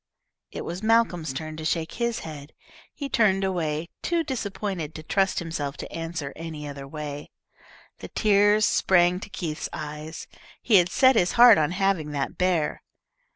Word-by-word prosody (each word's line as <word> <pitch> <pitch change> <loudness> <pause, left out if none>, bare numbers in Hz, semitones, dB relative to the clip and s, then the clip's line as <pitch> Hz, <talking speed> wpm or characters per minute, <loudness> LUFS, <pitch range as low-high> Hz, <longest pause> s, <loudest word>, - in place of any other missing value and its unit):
It - - -7
was 175 +3 -5
Malcolm's 215 -9 +2
turn 155 +4 -6
to 160 - -6
shake 160 0 -1
his 235 -1 -2
head. 150 -2 -9 0.4
He 285 - -6
turned 195 -7 +2
away, 170 -3 -2
too 340 -1 0
disappointed 200 - -4
to 155 - -7
trust 195 +3 +1
himself 150 -5 -3
to - - -8
answer 165 -4 -5
any 160 -2 -7
other 140 -1 -8
way. 145 0 -6 0.7
The - - -8
tears 205 0 +3
sprang 175 -1 +3
to 205 - -9
Keith's 160 -5 -4
eyes. 150 +1 -7 0.3
He 220 -4 +4
had 175 -1 +4
set 260 +4 +5
his 180 -5 +2
heart 235 -4 +8
on 150 -1 +2
having 185 -4 0
that 140 -1 -2
bear. 180 -4 0
170 Hz, 160 wpm, -25 LUFS, 155-200 Hz, 0.7 s, heart